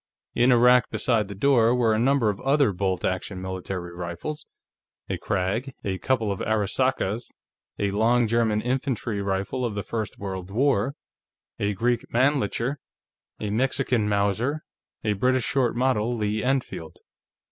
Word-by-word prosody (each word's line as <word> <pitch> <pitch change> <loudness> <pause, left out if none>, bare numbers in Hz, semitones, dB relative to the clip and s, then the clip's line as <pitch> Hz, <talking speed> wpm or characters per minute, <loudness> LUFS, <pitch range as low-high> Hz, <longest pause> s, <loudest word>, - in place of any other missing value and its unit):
In 125 +2 +4
a 120 - +6
rack 125 +1 +5
beside 110 -5 +1
the 100 - -7
door 120 +1 +4
were 115 -3 +3
a 110 - +1
number 125 -3 +3
of 100 - -9
other 140 -3 +3
bolt 95 0 -1
action 95 +1 -2
military 95 -1 -5
rifles 85 - -6 0.6
a - - -3
Krag, 110 +9 -2
a 95 -2 -2
couple 115 -6 0
of 100 - -3
Arisakas, 110 +1 0 0.5
a 100 -1 0
long 115 +4 +3
German 110 -1 +1
infantry 125 -4 -1
rifle 100 +6 -2
of 115 -4 -2
the 100 - -2
first 110 -3 -4
World 95 -2 -5
War, 130 +3 +1 0.6
a 105 0 0
Greek 120 +4 +1
Mannlicher, 130 0 +1 0.6
a 105 -1 -3
Mexican 125 -1 +1
Mauser, 105 +9 0 0.4
a 105 - +1
British 125 +5 +1
short 125 -4 +1
model 120 -2 +1
Lee 105 0 -1
Enfield. 125 -11 -2
110 Hz, 145 wpm, -25 LUFS, 100-125 Hz, 0.6 s, a